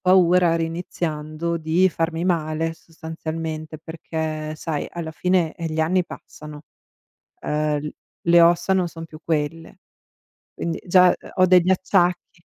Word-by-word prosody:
paura 180 -2 +4
riiniziando, 165 -1 -3
di 165 +4 +3
farmi 165 +1 -2
male 165 -2 0
sostanzialmente, 160 -1 -6
perché 160 -1 -5
sai 155 -2 -3
alla 165 -2 -5
fine, 175 0 +1
eh, 170 - -5
gli 160 0 -2
anni 180 +3 +2
passano, 150 -2 -11 0.8
ehm, 150 0 0
l 150 - -4 0.4
le 170 0 +7
ossa 170 +3 +4
non 185 -2 +1
son 165 -1 -8
più 155 -1 -12
quelle, 165 +1 -3 0.7
quindi 165 -1 -4
già, 180 0 +6
ehm, - - -14
ho 185 - +5
degli 180 0 +5
acciacchi. 180 -2 0
165 Hz, 135 wpm, -22 LUFS, 155-175 Hz, 0.8 s, le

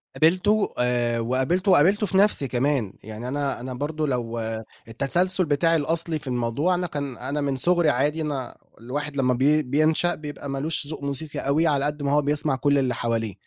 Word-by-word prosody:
قابلته 185 +6 +2
آآ، 120 -1 +1
وقابلته 130 - +1
وقابلته 195 +8 +4
في 190 0 0
نفسي 200 -9 +3
كمان 125 -5 0
يعني 110 +3 -7
أنا 140 -1 -2
أنا 130 +1 -6
برضو 150 +4 -3
لو 120 -4 -2 0.5
التسلسل 175 +10 +1
بتاعي 160 +3 +2
الأصلي 160 +1 0
في - - -11
الموضوع 125 +8 0
أنا 180 0 -2
كان 140 -5 -5
أنا 140 +4 -3
من 140 -1 -1
صغري 175 +3 +3
عادي 145 +4 0
أنا 140 -5 -4 0.2
الواحد 140 +4 -5
لمّا 130 -1 +2
بين 140 +2 +2
بينشأ 155 +4 +2
بيبقى 145 -2 -8
مالوش 145 +2 -2
ذوق 155 -2 -7
موسيقي 140 +2 -3
أوي، 155 +4 +1
على 140 -2 +1
قد 150 0 -3
ما 140 - 0
هو 150 0 +4
بيسمع 145 0 0
كل 145 +1 +2
اللي 130 -2 0
حواليه، 115 -3 -2
145 Hz, 185 wpm, -24 LUFS, 130-160 Hz, 0.5 s, وقابلته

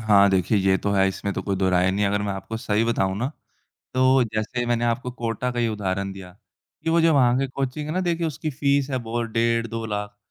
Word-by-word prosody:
हाँ, 100 -2 +5
देखिए 95 +2 +2
ये 95 0 +3
तो 100 - -2
है, 95 -1 +4
इसमें 100 +1 -3
तो - - -3
कोई 100 -1 -1
दो 95 0 +1
राय 90 +1 +3
नहीं, 100 +2 0
अगर 100 +1 0
मैं 100 -1 -2
आपको 95 +3 -5
सही 110 -1 0
बताऊँ 95 -5 0
ना, 125 +4 -1 0.7
तो 130 +1 +4
जैसे 110 +3 -1
मैंने 120 0 +1
आपको 120 +2 -1
कोटा 120 +1 -2
का 120 - -5
ही 120 -1 +2
उदाहरण 100 -2 -2
दिया 95 -2 -10 0.5
कि 165 - 0
वो 170 +1 +4
जो 165 0 +4
वहाँ 125 -3 +4
की 135 - +1
कोचिंग 135 +2 -3
है 155 - -3
ना, 185 - +1
देखिए 170 -2 0
उसकी 155 0 -3
फीस 140 0 +1
है 130 - 0
बहुत 115 0 -3
डेढ़ 115 +1 +1
2 115 0 -5
लाख, 105 -1 -4
115 Hz, 245 wpm, -24 LUFS, 100-130 Hz, 0.7 s, हाँ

